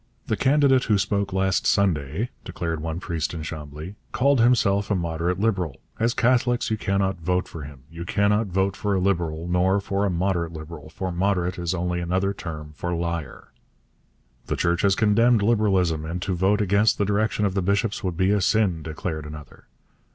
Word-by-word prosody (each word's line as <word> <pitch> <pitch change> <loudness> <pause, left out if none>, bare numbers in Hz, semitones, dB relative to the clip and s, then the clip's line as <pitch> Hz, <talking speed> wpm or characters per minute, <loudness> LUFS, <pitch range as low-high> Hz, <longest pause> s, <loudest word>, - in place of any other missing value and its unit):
'The - - 0
candidate 135 -1 +3
who 105 - +3
spoke 100 0 0
last 95 0 +1
Sunday,' 90 - +1
declared 85 -3 -4
one 80 +1 -3
priest 85 -3 -3
in 80 - -5
Chambly, 75 +3 -7 0.2
'called 140 0 +3
himself 100 -5 +3
a 100 - +2
moderate 85 +1 -1
Liberal. 95 - -1 0.2
As 115 +2 +1
Catholics 125 -1 +2
you - - +2
cannot 95 -3 -1
vote 90 +2 0
for 80 - -8
him; 70 -2 -11
you 85 +2 -8
cannot 105 +4 +1
vote 95 +1 0
for 100 -1 -1
a - - +1
Liberal, 85 -4 -1
nor 90 +3 +2
for 100 0 -2
a 100 - +2
moderate 85 -2 -1
Liberal, 80 -1 -9
for 90 +3 -4
moderate 90 0 0
is 85 0 -1
only 90 0 -1
another 95 +3 0
term 75 -5 -7
for 85 +3 -3
liar.' 85 -4 -4 1.0
'The - - -1
Church 85 0 +1
has 100 -1 +3
condemned 110 +1 +3
Liberalism, 95 -8 +2
and 85 +3 -4
to 95 - -1
vote 95 +4 +2
against 100 +1 +3
the 100 - +1
direction 105 +1 +1
of 95 - 0
the 95 - 0
bishops 100 +3 0
would 90 -3 -2
be 100 +2 +3
sin,' 95 -5 +2
declared 80 0 -5
another. 75 -3 -11
95 Hz, 180 wpm, -24 LUFS, 85-100 Hz, 1.0 s, candidate